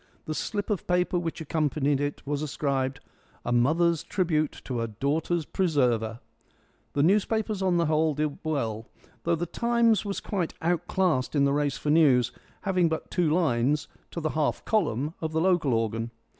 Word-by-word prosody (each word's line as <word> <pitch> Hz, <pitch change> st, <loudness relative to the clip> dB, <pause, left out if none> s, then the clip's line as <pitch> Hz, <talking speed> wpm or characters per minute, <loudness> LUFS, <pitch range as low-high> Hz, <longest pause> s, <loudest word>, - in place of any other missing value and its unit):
The 155 Hz, -, -3 dB
slip 205 Hz, +7 st, -3 dB
of 200 Hz, -, -2 dB
paper 180 Hz, 0 st, +2 dB
which 165 Hz, -1 st, -4 dB
accompanied 145 Hz, -2 st, 0 dB
it 145 Hz, 0 st, -3 dB
was 145 Hz, 0 st, -2 dB
inscribed 135 Hz, -3 st, -1 dB, 0.4 s
"A 120 Hz, -, -1 dB
mother's 155 Hz, +7 st, +3 dB
tribute 155 Hz, -5 st, 0 dB
to 125 Hz, -3 st, -3 dB
her 115 Hz, -, -1 dB
daughter's 150 Hz, +8 st, -1 dB
presserver". 125 Hz, -, 0 dB, 0.7 s
The 145 Hz, -, +2 dB
newspapers 210 Hz, +3 st, +1 dB
on 185 Hz, -2 st, +2 dB
the 170 Hz, -, +2 dB
whole 155 Hz, 0 st, +2 dB
did 150 Hz, -1 st, -2 dB
well, 115 Hz, -8 st, -2 dB, 0.4 s
though 170 Hz, 0 st, +3 dB
the 170 Hz, +2 st, -2 dB
Times 235 Hz, +3 st, +2 dB
was 200 Hz, -2 st, -3 dB
quite 185 Hz, -6 st, -3 dB
outclassed 170 Hz, -4 st, 0 dB
in 140 Hz, -1 st, +4 dB
the 140 Hz, -, +2 dB
race 145 Hz, -1 st, 0 dB
for 150 Hz, -, -1 dB
news, 135 Hz, -7 st, +4 dB, 0.3 s
having 185 Hz, -4 st, +2 dB
but 160 Hz, -, -4 dB
two 175 Hz, -4 st, +2 dB
lines 150 Hz, -4 st, +1 dB, 0.2 s
to -, -, -5 dB
the 155 Hz, -2 st, -1 dB
half 155 Hz, -2 st, -1 dB
column 150 Hz, -, 0 dB
of 160 Hz, -1 st, -3 dB
the 160 Hz, -, +1 dB
local 175 Hz, -6 st, +2 dB
organ. 115 Hz, 0 st, 0 dB
155 Hz, 170 wpm, -27 LUFS, 140-175 Hz, 0.7 s, in